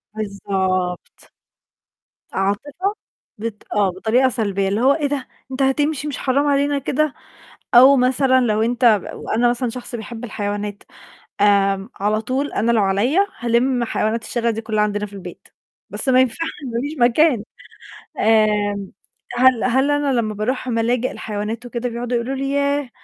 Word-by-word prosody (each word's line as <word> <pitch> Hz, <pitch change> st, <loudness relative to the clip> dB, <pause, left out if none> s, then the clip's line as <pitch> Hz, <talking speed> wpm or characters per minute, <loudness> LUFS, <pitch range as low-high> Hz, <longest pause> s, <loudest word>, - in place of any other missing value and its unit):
بالضبط. 190 Hz, -3 st, -3 dB, 1.0 s
عاطفة، 290 Hz, -, -1 dB, 0.4 s
بط 215 Hz, -1 st, -6 dB
آه 205 Hz, -2 st, +3 dB
بطريقة 225 Hz, +8 st, +2 dB
سلبية، 200 Hz, -5 st, -1 dB
اللي 205 Hz, +4 st, 0 dB
هو 270 Hz, +2 st, +5 dB
"إيه 295 Hz, -1 st, -1 dB
ده! 280 Hz, -2 st, -3 dB, 0.2 s
أنت 260 Hz, -, -3 dB
هتمشي 290 Hz, +2 st, +1 dB
مش 290 Hz, -, -4 dB
حرام 280 Hz, +2 st, +1 dB
علينا 285 Hz, 0 st, +1 dB
كده!" 285 Hz, +2 st, 0 dB, 0.6 s
أو 265 Hz, +3 st, +8 dB
مثلًا 260 Hz, +1 st, +3 dB
لو 220 Hz, -3 st, +1 dB
أنت 240 Hz, +2 st, 0 dB, 0.3 s
وأنا 240 Hz, +2 st, 0 dB
مثلًا 245 Hz, +1 st, -1 dB
شخص 245 Hz, +1 st, -7 dB
بيحب 235 Hz, +1 st, -7 dB
الحيوانات 205 Hz, -2 st, -4 dB, 0.6 s
آمم، 195 Hz, 0 st, +3 dB
على 210 Hz, +2 st, +1 dB
طول 270 Hz, +5 st, -2 dB
أنا 235 Hz, +1 st, +1 dB
لو 220 Hz, -, +3 dB
عليَّ 200 Hz, -, +1 dB, 0.2 s
هالِم 240 Hz, +1 st, +1 dB
حيوانات 225 Hz, 0 st, -1 dB
الشارع 235 Hz, -1 st, -1 dB
دي 225 Hz, 0 st, -3 dB
كلّها 215 Hz, -1 st, -1 dB
عندنا 210 Hz, 0 st, -1 dB
في 205 Hz, -, -17 dB
البيت، 185 Hz, -3 st, -10 dB, 0.4 s
بس -, -, -3 dB
ما 255 Hz, 0 st, +5 dB
ينفعش 260 Hz, +6 st, 0 dB, 0.3 s
ما 235 Hz, -, 0 dB
فيش 290 Hz, +3 st, -4 dB
مكان. 245 Hz, 0 st, +3 dB, 0.8 s
آمم 210 Hz, -3 st, +2 dB, 0.5 s
هل 255 Hz, -2 st, +4 dB
هل 265 Hz, +3 st, +2 dB
أنا 290 Hz, -1 st, +1 dB
لمّا 220 Hz, -4 st, 0 dB
بارُوح 250 Hz, +5 st, -2 dB
ملاجئ 240 Hz, +1 st, 0 dB
الحيوانات 215 Hz, +3 st, -5 dB
وكده 245 Hz, 0 st, -3 dB
بيقعدوا 240 Hz, +1 st, -3 dB
يقولوا 240 Hz, +3 st, -2 dB
لي 275 Hz, +1 st, -2 dB
"ياه! 280 Hz, -1 st, 0 dB
235 Hz, 150 wpm, -20 LUFS, 210-265 Hz, 1.0 s, أو